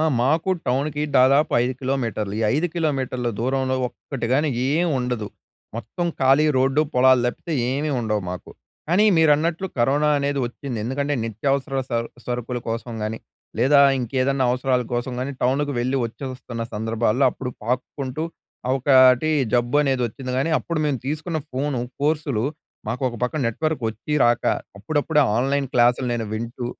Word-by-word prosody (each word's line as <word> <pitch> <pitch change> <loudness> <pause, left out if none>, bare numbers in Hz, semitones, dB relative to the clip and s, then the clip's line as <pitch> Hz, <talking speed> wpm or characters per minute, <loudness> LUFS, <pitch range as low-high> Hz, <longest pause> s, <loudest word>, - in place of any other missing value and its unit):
ఆ! - - +2 0.2
మాకు 155 +8 +2 0.2
టౌన్‍కి 145 +4 0 0.2
దాదాపు 135 +4 +4
5 125 +1 0
కిలోమీటర్లు. 115 -6 -2
ఈ - - 0
5 160 +4 +1
కిలోమీటర్ల 135 -6 -1
దూరంలో 130 +1 0
ఒక్కటి 125 -2 -6
గాని 150 +3 +2 0.2
ఏం 165 +5 +2
ఉండదు. 125 -4 -2 0.5
మొత్తం 175 - -3
ఖాళీ 135 +4 +5
రోడ్డు, 135 +3 +3
పొలాలు 130 0 +5
తప్పితే 160 +6 -4 0.2
ఏమీ 145 +3 -1
ఉండవు 105 -3 -1
మాకు. 90 - -7 0.4
కానీ, 190 +5 +4
మీరన్నట్లు 160 +3 +3
కరోనా 145 +5 +3
అనేది 140 0 -1
వచ్చింది. 125 -1 -6
ఎందుకంటే, 140 +4 -1
నిత్యావసర 135 +5 -1 0.2
స - - -6 0.3
సరుకుల 125 0 -3
కోసం 115 +1 -4
కానీ, 110 +1 -3 0.4
లేదా 140 +2 +5 0.2
ఇంకేదన్నా 130 +2 0
అవసరాల 125 0 +1
కోసం 120 +1 -2
కాని, 140 +2 -3
టౌన్‍కి 140 +3 +1
వెళ్ళి 130 +3 0
వచ్చేస్తున్న 125 -1 -7
సందర్భాల్లో, 110 +3 +1
అప్పుడు 125 -2 -6
పాక్కుంటూ 130 +4 -3 0.4
ఆ - - +2
ఒకటి 130 +2 +5 0.2
జబ్బు 120 +3 +2
అనేది 135 -3 +1
వచ్చింది 125 +3 -6
కానీ 135 +5 0
అప్పుడు 170 -2 -3
మేము 145 -4 0
తీసుకున్న 155 +3 -2
ఫోను 135 0 -1 0.2
కోర్సులు 145 -6 0 0.5
మాకు 125 +4 -3
ఒక 120 - -7
పక్కన 145 +4 -1
నెట్‌వర్క్ 155 +3 -2
వచ్చి, 115 +7 -7
రాక 120 0 +2 0.3
అప్పుడప్పుడే 150 +5 +1 0.2
ఆన్‍లైన్ 135 +2 +1
క్లాసులు 120 +1 +3
నేను 115 -1 -2
వింటూ 115 +2 -4
130 Hz, 150 wpm, -22 LUFS, 120-145 Hz, 0.5 s, ఖాళీ